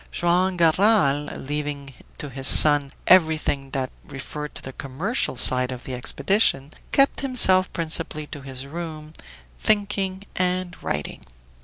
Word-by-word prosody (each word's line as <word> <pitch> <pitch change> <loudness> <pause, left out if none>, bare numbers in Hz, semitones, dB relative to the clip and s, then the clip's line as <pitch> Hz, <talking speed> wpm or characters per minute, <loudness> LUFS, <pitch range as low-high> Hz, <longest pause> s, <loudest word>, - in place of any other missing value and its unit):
Joam 180 +2 0
Garral, 165 -4 +3
leaving 145 -1 -5 0.2
to 145 - -7
his 135 0 -4
son 145 -2 +5
everything 155 -6 +2
that 135 -1 -3
referred 150 +2 -8
to - - -10
the 130 - -8
commercial 140 - -3
side 125 +1 +3
of 125 -1 -8
the 130 - -7
expedition, 140 - 0 0.2
kept 275 0 +2
himself 190 -9 +4
principally 160 -2 -1
to 145 -1 -9
his 135 -1 -8
room, 155 0 -8 0.5
thinking 200 -2 -1
and 180 0 -1
writing. 75 0 -5
155 Hz, 130 wpm, -23 LUFS, 135-185 Hz, 0.5 s, son